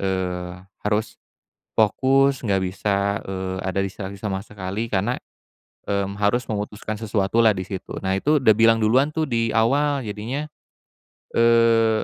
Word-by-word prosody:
eee, 90 -2 -2 0.3
harus 105 +1 -1 0.6
fokus, 135 +5 +3
enggak 95 -2 +1
bisa, 100 +2 -1
eee, 95 -1 -4
ada 95 0 -1
distraksi 95 0 -6
sama 100 -3 -2
sekali 105 +2 -4
karena, 105 +5 0 0.7
mmm, 100 0 -2
harus 115 +4 +1
memutuskan 105 0 -4
sesuatu 105 -1 -1
lah 110 -3 +5
di 95 - -3
situ. 95 -2 -6
Nah 95 0 0
itu 150 +4 +2
udah 110 -4 +6
bilang 115 0 +5
duluan 130 +7 +3
tuh 160 - 0
di 115 -1 +1
awal 140 +5 +2
jadinya, 110 +8 -4 0.9
eee 115 -1 +4
105 Hz, 140 wpm, -23 LUFS, 95-115 Hz, 0.9 s, udah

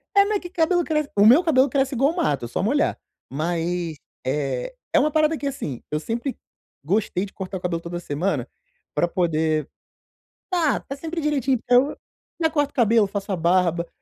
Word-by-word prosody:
É, 400 0 +7
mas 415 0 0
que 355 - -8
cabelo 350 0 +2
cresce 305 -3 -1
o 205 0 +5
meu 255 +11 +7
cabelo 275 -5 +4
cresce 270 0 0
igual 275 +7 +2
mato, 145 - 0
é - - -5
só 120 - -2
molhar, 285 - +1 0.3
mas, 170 +2 -2 0.3
eh, 145 - -2 0.2
é - - +6
uma 305 - +2
parada 310 +1 +2
que 290 - -6
assim, 150 - -4
eu 150 - 0
sempre 235 - -3 0.5
gostei 195 +3 0
de 195 - -13
cortar 190 0 -5
o - - -7
cabelo 170 -2 -2
toda 170 +1 -5
semana, 175 +3 -2 0.5
pra 175 - +2
poder 160 -4 0 0.8
tá 330 -6 +2
tá 275 - -7
sempre 325 +3 -4
direitinho, 275 -4 +1
então, 250 +4 +3 0.5
já 320 - +3
corto 290 -2 0
o - - -43
cabelo, 225 -3 +4
faço 200 0 -4
a 190 - +1
barba, 170 0 +2
225 Hz, 190 wpm, -23 LUFS, -, 0.8 s, É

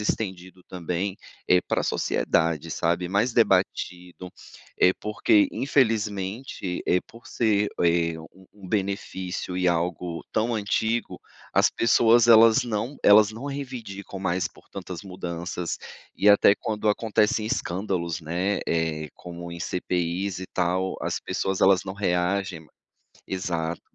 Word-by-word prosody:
estendido 95 -4 -4
também, 90 +2 -3 0.3
eh, 90 0 +5
pra - - -1
sociedade, 80 -1 0
sabe, 85 +2 0
mais 105 +6 +1
debatido. 90 -4 0 0.5
Eh, 90 - +6
porque, 105 -1 +3
infelizmente, 110 -6 -1
eh, 90 - +3
por 115 +1 -16
ser, 105 -3 +1
eh, 85 -1 +2 0.2
um 95 0 -19
um 100 -3 -12
benefício 95 -2 -3
e 90 0 +1
algo 85 0 -2
tão 115 +2 +1
antigo, 110 +2 -1 0.3
as - - +4
pessoas 115 0 +4
elas 115 +2 +7
não 115 +4 -3
elas 105 +1 +7
não 115 +5 -8
reivindicam 125 -9 -6
mais 90 -1 0
por - - -21
tantas 90 +1 -7
mudanças, 90 -2 -5 0.4
e 105 - +3
até 100 0 +6
quando 110 -1 -2
acontecem 110 0 +1
escândalos, 90 -7 -2
né, 90 +5 -1
eh, 80 -2 -1
como 85 -1 -9
em 85 - -8
CPIs 90 +2 -2
e 95 - -6
tal, 90 +1 -1
as - - -2
pessoas 95 -1 -2
elas 95 -1 +4
não 95 0 -5
reagem 90 -2 -1
ma 80 - -19 0.6
exato. 85 -3 -3
95 Hz, 130 wpm, -25 LUFS, 90-105 Hz, 0.6 s, elas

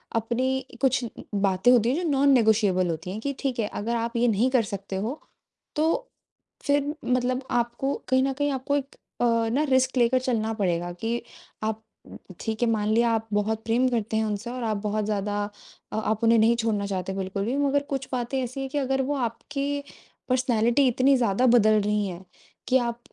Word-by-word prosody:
अपनी 255 +4 0 0.2
कुछ 265 -2 +2
ब 230 - -10 0.2
बातें 195 +4 +4
होती 240 -2 +4
हैं 260 - +1
जो 335 - 0
नॉन 280 0 +3
नेगोशिएबल 210 -6 +3
होती 165 +2 -4
हैं 210 - -5
कि 280 +3 -2
ठीक 265 -4 -2
है, 215 - +1
अगर 230 +3 -3
आप 235 +1 -2
ये 240 +1 +3
नहीं 230 +3 +2
कर 255 -3 +3
सकते 200 -1 -6
हो, 225 +10 -3 0.5
तो 325 +11 0 0.6
फिर 285 0 +1
मतलब 255 +1 0
आपको 240 +3 0 0.2
कहीं 260 0 +4
न 270 0 0
कहीं 290 +2 0
आपको 270 +1 -1
एक 275 -1 -6 0.3
अ, - - +4 0.2
ना 275 +6 +1
रिस्क 260 0 +2
लेकर 245 +1 +4
चलना 225 -3 -1
पड़ेगा 175 -4 -1
कि 225 +6 -3 0.4
आप 220 0 -2 0.6
ठीक 220 +1 -3
है 235 - +3
मान 210 -2 0
लिया 235 +2 +3
आप 225 0 -1
बहुत 215 +2 0
प्रेम 240 +3 +2
करते 225 -2 -1
हैं 220 - +2
उनसे 215 +2 -3
और 250 0 -5
आप 215 -2 0
बहुत 210 0 -1
ज़्यादा 205 0 -1 0.5
अ, - - -2
आप 220 +1 -1
उन्हें 230 0 +5
नहीं 225 +2 +4
छोड़ना 220 -3 0
चाहते 190 -1 -3
हैं 195 - -4
बिल्कुल 195 +1 -3
भी 250 +5 -1
मगर 285 0 +2
कुछ 270 -1 -3
बातें 250 +1 -1
ऐसी 255 +2 -5
हैं 270 - -4
कि 290 - -3
अगर 270 -1 +1
वो - - 0
आपकी 280 +3 -3 0.5
पर्सनैलिटी 250 +1 +3
इतनी 260 +3 +4
ज़्यादा 235 0 +2
बदल 215 -3 +5
रही 210 0 0
है, 180 0 -7 0.4
कि 260 - +4
आप 235 -1 -2
235 Hz, 200 wpm, -25 LUFS, 215-260 Hz, 0.6 s, उन्हें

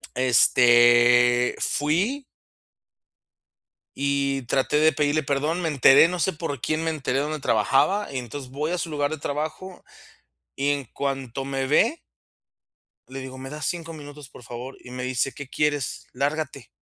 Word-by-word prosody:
Este, 120 0 +5
fui. 190 - 0 1.7
Y 140 -1 -1
traté 135 +4 0
de 155 0 +4
pedirle 150 +2 0
perdón, 150 +5 -1
me 165 - -1
enteré, 140 +2 +6
no 180 0 -4
sé 190 - +1
por 150 -5 -5
quién 155 +5 -1
me 165 - -1
enteré 135 -4 -2
dónde 150 +2 -2
trabajaba, 135 - +1
y 135 - -4
entonces 125 +2 -7
voy 150 +4 -3
a 180 - -1
su 165 - -3
lugar 145 -2 -1
de 155 - -4
trabajo 155 +6 -5 0.7
y 140 +1 0
en 140 -2 -2
cuanto 135 0 -4
me 135 -1 -2
ve. 230 - +2 1.1
Le 135 +1 -7
digo: 130 0 -8
"¿Me 135 0 -8
das 150 -1 -5
5 165 -2 -3
minutos, 145 -2 -11
por 125 - -15
favor?", 120 +3 -8
y 125 - -13
me 125 0 -6
dice: 130 +1 -1
"¿Qué 145 -2 -9
quieres?, 145 -3 -2
lárgate", 140 0 -3
140 Hz, 155 wpm, -24 LUFS, 130-155 Hz, 1.7 s, enteré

